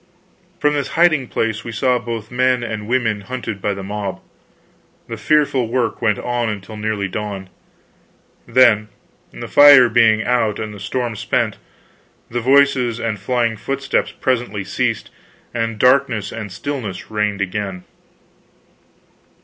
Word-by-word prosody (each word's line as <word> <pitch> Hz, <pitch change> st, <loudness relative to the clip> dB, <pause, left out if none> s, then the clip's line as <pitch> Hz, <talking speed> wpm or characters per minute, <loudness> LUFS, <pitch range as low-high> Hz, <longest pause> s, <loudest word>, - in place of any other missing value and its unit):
From 150 Hz, -2 st, +2 dB
this 145 Hz, -2 st, -1 dB
hiding 155 Hz, -6 st, +4 dB
place 115 Hz, -1 st, -2 dB
we 115 Hz, -, -6 dB
saw 125 Hz, +3 st, +1 dB
both 115 Hz, -2 st, -6 dB
men 125 Hz, 0 st, +1 dB
and 110 Hz, -2 st, -5 dB
women 115 Hz, -4 st, 0 dB
hunted 115 Hz, -3 st, -6 dB
by 100 Hz, 0 st, -1 dB
the 100 Hz, -, -7 dB
mob. 100 Hz, -1 st, -4 dB, 0.9 s
The -, -, -5 dB
fearful 145 Hz, -5 st, +1 dB
work 120 Hz, 0 st, -1 dB
went 105 Hz, -3 st, +2 dB
on 120 Hz, -1 st, -2 dB
until 105 Hz, +1 st, -6 dB
nearly 105 Hz, -2 st, -2 dB
dawn. 100 Hz, -2 st, -6 dB, 1.0 s
Then, 110 Hz, -5 st, +4 dB, 0.4 s
the -, -, -8 dB
fire 140 Hz, -4 st, +8 dB
being 110 Hz, -2 st, +4 dB
out 115 Hz, -4 st, +1 dB
and 110 Hz, -1 st, -5 dB
the 105 Hz, -, -10 dB
storm 120 Hz, +3 st, -3 dB
spent, -, -, -1 dB, 0.7 s
the 120 Hz, +1 st, -2 dB
voices 130 Hz, -2 st, +3 dB
and 110 Hz, -3 st, -2 dB
flying 115 Hz, +2 st, 0 dB
footsteps 135 Hz, +4 st, -1 dB
presently 120 Hz, -6 st, -2 dB
ceased, -, -, -2 dB, 0.4 s
and 115 Hz, -1 st, -2 dB
darkness 125 Hz, -4 st, +2 dB
and 110 Hz, -3 st, -6 dB
stillness 110 Hz, -4 st, -5 dB
reigned 105 Hz, -2 st, -1 dB
again. 95 Hz, -1 st, -3 dB
115 Hz, 135 wpm, -19 LUFS, 105-125 Hz, 1.0 s, fire